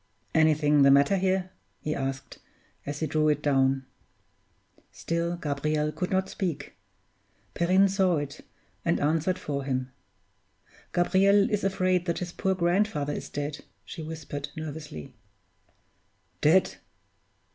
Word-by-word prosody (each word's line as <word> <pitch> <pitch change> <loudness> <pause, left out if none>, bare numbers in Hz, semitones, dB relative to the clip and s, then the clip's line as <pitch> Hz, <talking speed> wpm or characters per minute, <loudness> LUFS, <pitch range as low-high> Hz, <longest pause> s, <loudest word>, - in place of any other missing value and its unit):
"Anything 155 -2 +4
the 140 - +7
matter 140 +7 +5
here?" 185 -1 0 0.3
he 150 - -2
asked, 135 -1 -4 0.5
as 145 +2 -4
he - - +1
drew 155 +1 +1
it 150 0 0
down. 135 -2 +2 1.1
Still 170 +1 -2
Gabriel 150 -1 -1
could 180 +3 -3
not 190 0 +1
speak. 170 -8 -4 0.8
Perrine 185 +3 +4
saw 190 -3 +2
it, 145 0 -5 0.4
and 170 - +1
answered 160 +5 +1
for 140 -6 -4
him. 130 -1 -2 1.0
"Gabriel 195 +3 +4
is 210 -1 0
afraid 185 -2 +1
that 170 - 0
his 180 -1 -4
poor 190 0 0
grandfather 175 -4 +1
is - - -6
dead," 145 +1 -4 0.2
she - - -8
whispered, 155 -2 -6
nervously. 150 -3 -7 1.3
"Dead!" 175 +5 +4
155 Hz, 125 wpm, -27 LUFS, 145-185 Hz, 1.3 s, the